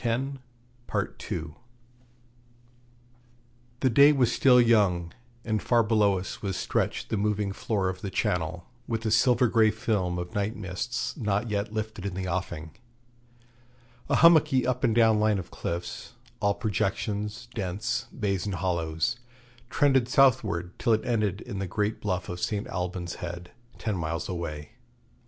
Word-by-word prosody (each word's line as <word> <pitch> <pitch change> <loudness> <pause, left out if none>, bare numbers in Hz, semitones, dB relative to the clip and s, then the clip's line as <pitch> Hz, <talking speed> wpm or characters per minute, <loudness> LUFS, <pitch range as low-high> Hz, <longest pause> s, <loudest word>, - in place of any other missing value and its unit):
The 120 - -4 2.4
day 140 +4 +8
was 130 -5 +2
still 125 -2 +5
young, 100 -8 +3 0.3
and 110 -2 0
far 120 -2 +3
below 105 -3 +3
us 90 - -6
was 95 -2 -2
stretched - - -1
the 110 - 0
moving 105 -1 0
floor 100 -2 -1
of 95 0 -4
the 100 - -4
Channel, 90 -1 -1 0.2
with 115 -1 -3
a 110 - +1
silver 125 +2 +4
grey 110 -1 +4
film 105 -5 -1
of 90 0 -5
night 105 +2 -1
mists 105 +5 -3
not 105 -2 -1
yet 105 0 -1
lifted 110 -2 -4
in 95 - -5
the 95 -1 -3
offing. 85 -3 -3 1.4
A - - +3
hummocky 155 -6 +5
up 125 0 -1
and 110 - +3
down 110 -2 +5
line 105 -1 +3
of 90 -2 -6
cliffs, 85 +1 -5 0.3
all 100 0 +1
projections, 105 +1 -2
dents, 105 +4 -2
bays, 100 -4 -2
and 100 - -2
hollows, 85 +4 -1 0.5
trended 135 -4 +3
southward 105 -10 +3
till 115 - +3
it 110 - 0
ended 105 -5 0
in 100 - -6
the 100 - -2
great 105 +4 -2
bluff 95 -3 -2
of 90 - -5
St. 105 +2 -2
Alban's 90 -1 -4
Head, 90 0 -6 0.3
ten 110 -4 -2
miles 85 0 -3
away. 75 -5 -5
105 Hz, 145 wpm, -27 LUFS, 90-115 Hz, 2.4 s, day